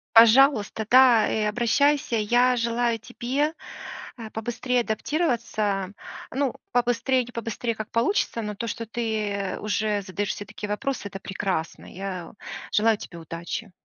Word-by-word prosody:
Пожалуйста, 230 -1 +6
да, 250 -3 +7
и 215 - 0
обращайся. 240 +5 +2
Я 240 +4 +3
желаю 235 0 +1
тебе, 260 +6 -1 0.6
а, 225 -2 -7
побыстрее 240 +2 -1
адаптироваться. 220 - -1 0.4
Ну, 270 -1 0 0.2
побыстрей, 245 +1 +2
не 245 - -11
побыстрей, 230 0 -3
как 215 0 -6
получится, 230 - +1
но 210 -1 -4
то, 230 +3 -4
что 230 +1 -4
ты 215 -4 -2
уже 210 0 0
задаешь 195 +2 -2
себе 205 - -8
такие 210 0 -7
вопросы,- 210 +2 -2
это 195 - -7
прекрасно. 190 -4 -3
Я 185 -2 -6 0.4
желаю 220 +1 +3
тебе 170 -4 -9
удачи. 170 +5 -6
225 Hz, 135 wpm, -25 LUFS, 205-245 Hz, 0.6 s, да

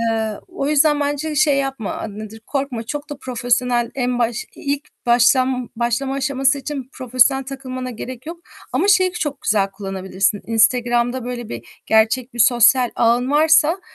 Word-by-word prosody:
Eee, 225 -1 0 0.2
o 325 -6 -3
yüzden 300 0 +3
bence 290 +2 -2
şey 290 -2 +3
yapma. 270 -6 -3
A, - - -5
nedir? 215 +1 -9
Korkma. 270 -5 -3
Çok 290 +5 -6
da 285 - -6
profesyonel 245 -1 0
en 250 -2 -1
baş 235 0 -1
ilk 285 +1 -3 0.2
başlan 250 +1 +3
başlama 240 +3 -1
aşaması 275 +1 +1
için 275 -2 -6
profesyonel 255 +1 +2
takılmana 255 -1 -6
gerek 250 +3 -8
yok. 335 +1 -7 0.3
Ama 400 - +1
şeyi 370 -2 +4
çok 295 -5 -4
güzel 200 -2 +1
kullanabilirsin. 195 0 -2
Instagram'da 240 +2 +1
böyle 245 -2 -5
bir 115 0 -10
gerçek 230 +3 +2
bir - - -9
sosyal 245 +1 +5
ağın 240 +3 +2
varsa, 315 +3 +4
255 Hz, 155 wpm, -20 LUFS, 235-280 Hz, 0.3 s, sosyal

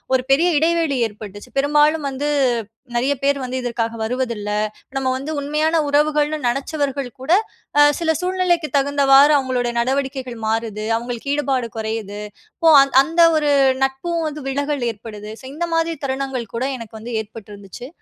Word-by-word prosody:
ஒரு 255 - +2
பெரிய 335 +6 +4
இடைவெளி 325 -2 +1
ஏற்பட்டுச்சு. 205 -1 -11
பெரும்பாலும் 295 +2 +3
வந்து 275 +2 -3 0.7
நிறைய 260 +4 +2
பேர் 280 0 +2
வந்து, 255 +1 -3
இதற்காக 230 -1 -2
வருவதில்ல. 230 -3 -2 0.5
நம்ம 260 -1 0
வந்து 285 +4 -5
உண்மையான 305 +3 +1
உறவுகள்னு 300 +1 +2
நினச்சவர்கள் 275 +1 -2
கூட 285 +6 -2 0.5
அ - - +9 0.2
சில 320 -1 +1
சூழ்நிலைக்கு 360 -3 0
தகுந்தவாறு 280 +1 +5
அவுங்களோட 255 -3 -1
நடவடிக்கைகள் 260 -1 -2
மாறுது. 220 -1 -2
அவுங்களுக்கு 240 +3 -5
ஈடுபாடு 270 -5 -1
குறையுது. 220 -2 -4 0.4
ஸோ, 330 - +3
அ - - +7 0.2
அந்த 330 +4 +1 0.2
ஒரு 295 -1 +1 0.3
நட்பும் 330 +5 -3
வந்து 300 0 -6
விலகல் 285 -2 -1
ஏற்படுது. 210 -1 -9
ஸோ, - - -13
இந்த 345 +1 -2
மாதிரி 330 0 0
தருணங்கள் 265 -4 -3
கூட 240 - -1
எனக்கு 225 -2 -10
வந்து 240 +2 -7
ஏற்பட்டிருந்துச்சு. 210 +1 -11
270 Hz, 145 wpm, -20 LUFS, 235-300 Hz, 0.7 s, அ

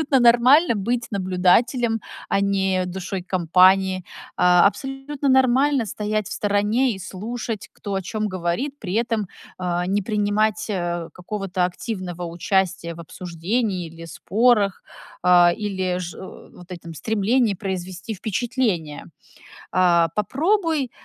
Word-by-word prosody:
абсолютно 275 -4 +2
нормально 245 +5 +5
быть 235 +4 -1
наблюдателем, 210 +5 +2 0.3
а 195 - +2
не 190 -2 +1
душой 185 +1 -5
компании. 185 +1 +3 0.3
Э, 180 0 +5
абсолютно 270 +5 -1
нормально 265 0 +3
стоять 210 +1 -2
в - - -6
стороне 210 +5 +1
и 190 - -9
слушать, 220 +4 -5
кто 200 - -7
о 195 - -1
чём 215 +3 -3
говорит, 185 +11 -3
при 190 -4 -5
этом, 225 -2 0 0.3
э, 175 -1 -1
не 200 +2 +1
принимать, 210 0 0
э, 175 -3 -2
какого-то 190 0 -5
активного 180 -2 -6
участия 170 0 -1
в 170 - -10
обсуждении 180 +3 -3
или 165 +1 -11
спорах, 205 +3 +1 0.4
э, 175 -1 +6
или 185 -3 -2
же 175 -1 -7
вот 180 -1 -12
этом 170 -1 -9
стремлении 220 - +1
произвести 190 +2 -5
впечатление. 200 - -2 0.7
Э, 170 -2 +4
попробуй, 310 - 0
195 Hz, 125 wpm, -22 LUFS, 180-235 Hz, 0.7 s, э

